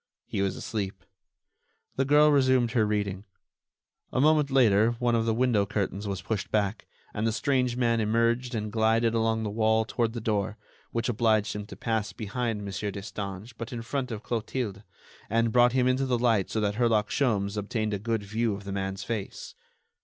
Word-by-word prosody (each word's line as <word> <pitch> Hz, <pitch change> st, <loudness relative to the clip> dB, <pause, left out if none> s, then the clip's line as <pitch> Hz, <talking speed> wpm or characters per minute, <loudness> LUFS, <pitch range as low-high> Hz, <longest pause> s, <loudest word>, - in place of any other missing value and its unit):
He -, -, -3 dB
was 95 Hz, -1 st, 0 dB
asleep. 100 Hz, -4 st, -4 dB, 0.9 s
The 135 Hz, -, +1 dB
girl 150 Hz, +2 st, +5 dB
resumed 130 Hz, -4 st, +3 dB
her 110 Hz, -2 st, +2 dB
reading. 100 Hz, -2 st, -1 dB, 0.9 s
A -, -, 0 dB
moment 150 Hz, 0 st, +4 dB
later 115 Hz, -4 st, +4 dB
one 120 Hz, 0 st, 0 dB
of 115 Hz, 0 st, +1 dB
the 115 Hz, -, +2 dB
window 115 Hz, -5 st, +2 dB
curtains 100 Hz, 0 st, -2 dB
was 95 Hz, -1 st, -4 dB
pushed 105 Hz, -1 st, -3 dB
back, 105 Hz, -1 st, -1 dB, 0.3 s
and 110 Hz, +2 st, -1 dB
the -, -, +2 dB
strange 125 Hz, 0 st, 0 dB
man 115 Hz, -2 st, +2 dB
emerged 115 Hz, +3 st, +1 dB
and 105 Hz, -1 st, -3 dB
glided 115 Hz, +1 st, +2 dB
along 110 Hz, -1 st, +1 dB
the 105 Hz, -, -2 dB
wall 110 Hz, +1 st, +2 dB
toward 115 Hz, -1 st, -1 dB
the 120 Hz, -, -4 dB
door, 105 Hz, -2 st, -1 dB, 0.3 s
which 115 Hz, -1 st, -1 dB
obliged 110 Hz, -3 st, +1 dB
him 105 Hz, 0 st, -5 dB
to -, -, -9 dB
pass 110 Hz, -3 st, -2 dB
behind 110 Hz, 0 st, -3 dB
Mon. 100 Hz, -, -5 dB, 0.2 s
Destange 100 Hz, +2 st, -6 dB
but 115 Hz, 0 st, -5 dB
in 120 Hz, -2 st, -5 dB
front 130 Hz, +1 st, -3 dB
of 110 Hz, -1 st, -6 dB
Clotilde, 115 Hz, -3 st, -3 dB, 0.5 s
and 115 Hz, +1 st, +2 dB
brought 120 Hz, 0 st, +5 dB
him 130 Hz, -1 st, +3 dB
into 130 Hz, +1 st, +1 dB
the 125 Hz, -2 st, +1 dB
light 115 Hz, -5 st, +2 dB
so 110 Hz, -, -1 dB
that 105 Hz, -1 st, -1 dB
Herlock 115 Hz, -3 st, +2 dB
Sholmes 105 Hz, -7 st, +1 dB
obtained 105 Hz, +1 st, -2 dB
a 100 Hz, -, -1 dB
good 115 Hz, 0 st, -1 dB
view 110 Hz, +1 st, -1 dB
of 100 Hz, -, -9 dB
the 100 Hz, -, -6 dB
man's 95 Hz, 0 st, -3 dB
face. 110 Hz, -4 st, -5 dB
110 Hz, 190 wpm, -27 LUFS, 105-120 Hz, 0.9 s, girl